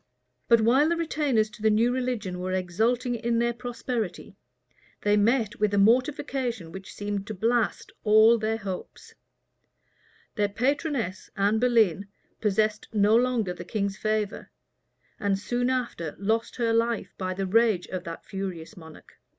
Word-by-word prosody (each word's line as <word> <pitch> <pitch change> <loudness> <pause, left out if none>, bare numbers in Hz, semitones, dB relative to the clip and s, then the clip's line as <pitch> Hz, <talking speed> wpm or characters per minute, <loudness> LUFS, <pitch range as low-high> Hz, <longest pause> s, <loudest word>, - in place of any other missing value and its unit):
But 230 -1 +5
while 260 +7 +4
the 340 - +1
retainers 295 -9 +1
to - - -14
the 220 - +4
new 230 +3 +3
religion 240 -8 -2
were 185 +1 -3
exulting 225 +8 0
in 235 0 -1
their 235 +1 +1
prosperity, 235 -4 -4 0.7
they 205 0 +3
met 220 +1 +1
with 210 -1 +2
a - - +1
mortification 240 - +1
which 190 +1 -9
seemed 205 -1 -4
to 215 - -5
blast 230 +3 0
all 220 +2 +6
their 220 +1 -1
hopes: 195 -4 -7 1.2
their 205 -2 0
patroness, 255 - -1
Anne 205 +2 +2
Boleyn, 220 -6 +2 0.3
possessed 215 0 0
no 210 0 +3
longer 235 -6 +1
the 175 - -8
king's 200 +1 -2
favor; 215 -1 -2 0.7
and 200 -2 +1
soon 245 +5 -1
after 235 - -2
lost 220 +3 -1
her 230 -2 0
life 230 0 0
by 185 -1 -2
the 195 +1 -2
rage 215 -2 +3
of 185 -1 -4
that 165 0 -7
furious 190 -1 -6
monarch. 160 -4 -14
220 Hz, 150 wpm, -26 LUFS, 195-240 Hz, 1.2 s, all